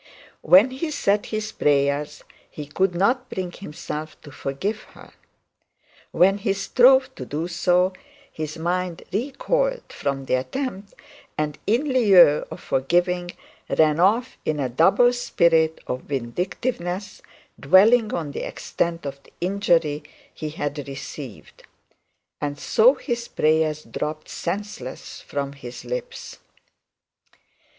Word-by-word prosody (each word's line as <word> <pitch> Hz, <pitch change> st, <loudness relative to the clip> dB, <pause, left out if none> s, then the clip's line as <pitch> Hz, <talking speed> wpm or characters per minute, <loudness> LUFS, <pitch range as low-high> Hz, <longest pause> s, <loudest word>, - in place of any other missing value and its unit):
When 205 Hz, +8 st, +6 dB
he 275 Hz, +5 st, -3 dB
said 210 Hz, -9 st, 0 dB
his 215 Hz, 0 st, -3 dB
prayers, 145 Hz, +1 st, 0 dB, 0.3 s
he 150 Hz, -, -7 dB
could 180 Hz, +5 st, 0 dB
not 250 Hz, +8 st, +1 dB
bring 185 Hz, -5 st, -4 dB
himself 155 Hz, -3 st, -7 dB
to 145 Hz, -, -11 dB
forgive 190 Hz, +12 st, -3 dB
her. -, -, -14 dB, 1.0 s
When 195 Hz, +3 st, +3 dB
he 200 Hz, -1 st, 0 dB
strove 255 Hz, +6 st, +4 dB
to -, -, -7 dB
do 155 Hz, +4 st, -3 dB
so, 180 Hz, +2 st, +2 dB, 0.4 s
his 155 Hz, 0 st, -5 dB
mind 175 Hz, +1 st, -2 dB
recoiled -, -, -1 dB
from 135 Hz, -1 st, -3 dB
the -, -, -2 dB
attempt, 195 Hz, -, -3 dB, 0.4 s
and 150 Hz, -1 st, -2 dB
in 260 Hz, +6 st, +1 dB
lieu 190 Hz, -, +6 dB
of -, -, -8 dB
forgiving, 175 Hz, +6 st, 0 dB, 0.5 s
ran 155 Hz, 0 st, +4 dB
off 220 Hz, +8 st, +2 dB
in 155 Hz, -1 st, -1 dB
a 130 Hz, -2 st, -1 dB
double 195 Hz, -, +4 dB
spirit 165 Hz, -9 st, +2 dB
of 125 Hz, 0 st, -3 dB
vindictiveness, 175 Hz, -, -3 dB, 0.4 s
dwelling 215 Hz, +4 st, +5 dB
on 155 Hz, -4 st, -3 dB
the -, -, -5 dB
extent 170 Hz, -2 st, -3 dB
of 140 Hz, 0 st, -6 dB
the -, -, -22 dB
injury 170 Hz, -5 st, +1 dB, 0.3 s
he 155 Hz, -, -5 dB
had 145 Hz, -1 st, -4 dB
received. 135 Hz, -3 st, -9 dB, 0.8 s
And 145 Hz, -1 st, -3 dB
so 245 Hz, -, +4 dB
his 240 Hz, -3 st, -4 dB
prayers 155 Hz, -1 st, +1 dB
dropped 155 Hz, +1 st, -5 dB
senseless 175 Hz, -8 st, -5 dB
from 140 Hz, -1 st, -4 dB
his 125 Hz, -3 st, -10 dB
lips. -, -, -6 dB
175 Hz, 125 wpm, -23 LUFS, 150-215 Hz, 1.0 s, When